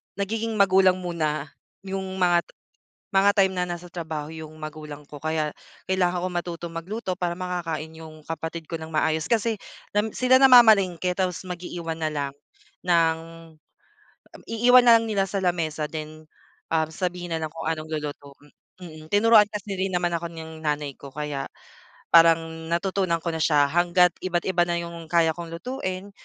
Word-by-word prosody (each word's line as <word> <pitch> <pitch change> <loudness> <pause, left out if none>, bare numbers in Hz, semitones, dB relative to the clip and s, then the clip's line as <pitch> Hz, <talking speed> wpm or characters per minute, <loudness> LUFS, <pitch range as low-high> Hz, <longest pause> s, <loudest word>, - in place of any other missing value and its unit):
nagiging 220 +3 -2
magulang 190 -2 +4
muna 155 -4 -2 0.3
yung 190 0 -4 0.2
mga 175 -1 +3 0.7
mga 195 +1 +5
time 195 -1 +4
na 180 -1 -1
nasa 175 0 -7
trabaho 160 -3 -5
yung 160 -1 -9
magulang 155 -1 -8
ko 145 0 -11
kaya 155 0 -1 0.4
kailangan 180 -1 +1
ko - - 0
matutong 170 -1 -4
magluto 185 +3 -4
para 175 -1 -1
makakain 175 -3 -4
yung 155 -1 -11
kapatid 165 +1 -5
ko 165 - -3
ng 160 - -7
maayos. 160 0 +1
Kasi 225 0 +1 0.4
nam 210 +1 +2
sila 255 +1 +5
namamalengke 210 -9 +6
tapos 185 -2 -1
mag-iiwan 175 -2 -5
na 155 - 0
lang 145 -2 -3 0.5
ng, 165 -2 +3 1.2
um, - - -17
iiwan 245 +2 +5
na 235 -1 +9
lang 230 - +1
nila 195 -2 +1
sa 195 0 -2
lamesa 165 -3 -1
then, 155 0 -7 0.5
um, 160 -1 +2
sabihin 175 0 -4
na 160 - -5
lang 155 -1 -4
kung 165 0 -5
anong 155 -1 -3
luluto, 145 -2 -5 0.5
mm. 155 -3 -11
Tinuruan 215 +1 +6
kasi 205 -1 -5
rin 190 0 -1
naman 175 -1 +1
ako 170 0 -6
ng 160 -1 -9
nanay 150 -2 -2
ko 140 -1 -12
kaya 150 -1 -4 0.7
parang 165 0 +4
natutunan 185 0 0
ko 170 - 0
na 160 - -3
siya 145 -2 +4
hangga't 175 +1 +4
iba't 175 -2 -1
iba 175 -2 +3
na 170 - 0
'yong 170 -1 -8
kaya 165 -2 +4
kong 170 -1 -7
lutuin. 185 -1 -5
170 Hz, 165 wpm, -25 LUFS, 160-190 Hz, 1.2 s, na